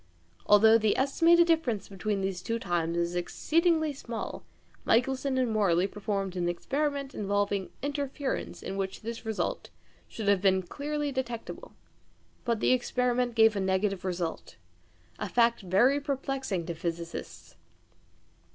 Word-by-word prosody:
Although 220 +2 +7
the 215 -1 +2
estimated 335 +6 +4
difference 320 - +1
between 200 +1 -2
these 190 -2 -2
two 230 +5 -2
times 170 -5 -1
is 170 0 -1
exceedingly 315 - +1
small, 235 -4 -6 0.4
Michelson 260 +3 +1
and 250 -3 +1
Morley 190 -5 +2
performed 195 -2 -3
an 175 -1 0
experiment 280 - -2
involving 205 -1 -1
interference 285 -1 -3
in 195 - -4
which 190 -1 -3
this 230 +1 -5
difference 220 -2 -3 0.4
should 220 -3 -6
have 200 -2 +4
been 190 -1 +3
clearly 295 +8 -3
detectable. 245 -4 -5 0.7
But 235 -2 0
the - - +3
experiment 250 -1 0
gave 220 -1 +5
a - - 0
negative 190 0 0
result 175 -3 -4 0.6
a - - -3
fact 235 -1 +3
very 205 +10 +3
perplexing 270 - -2
to 170 - -3
physicists. 170 0 -6
220 Hz, 135 wpm, -29 LUFS, 190-265 Hz, 0.7 s, Although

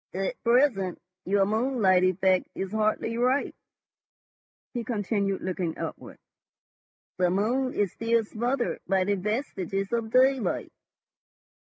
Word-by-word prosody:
"At 195 +6 -3
present 235 -7 +2 0.3
your 195 +1 +3
moonlight 215 -4 +2
effect 185 0 +2
is 190 0 -4
hardly 220 +2 0
ripe," 255 +3 +1 1.2
he 240 -2 -3
continued, 205 -3 -1
looking 180 -3 -2
upward. - - -7 1.0
"The 180 -1 +3
moon 240 +8 0
is 200 -4 +1
still 230 0 +1
smothered 240 +4 -2
by 190 0 +2
the 205 +2 +1
vestiges 195 - -2
of 230 -1 -1
daylight." 260 +1 +2
210 Hz, 110 wpm, -27 LUFS, 190-240 Hz, 1.2 s, your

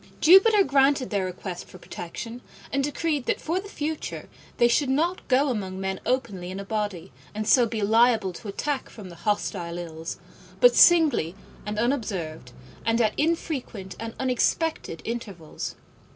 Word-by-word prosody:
Jupiter 390 +5 +7
granted 275 -3 +2
their 200 -3 0
request 180 0 -6
for - - -13
protection, 230 +7 -7 0.3
and 275 0 +1
decreed 295 -1 -1
that - - +1
for 335 +4 -1
the 400 +1 -9
future 310 -3 -4 0.3
they 240 - +5
should 260 +3 +2
not 330 +7 0
go 275 +2 +3
among 190 -6 -3
men 190 0 -3
openly 205 -9 -1
in 190 +1 -5
a 200 - -6
body, 205 -7 -3 0.2
and 215 0 -3
so 245 -3 +5
be 220 -2 -3
liable 220 -2 +3
to 210 - -10
attack 275 +7 -3
from 205 -5 -10
the 170 - -11
hostile 175 -2 -2
Ills, 165 -1 -6 0.4
but - - +6
singly 310 - +5 0.3
and 210 0 -3
unobserved, 195 - -2 0.3
and 225 +1 +1
at 215 -2 +2
infrequent 285 - -2
and 225 0 -6
unexpected 260 - 0
intervals. 200 -9 -5
230 Hz, 155 wpm, -25 LUFS, 190-280 Hz, 0.4 s, Jupiter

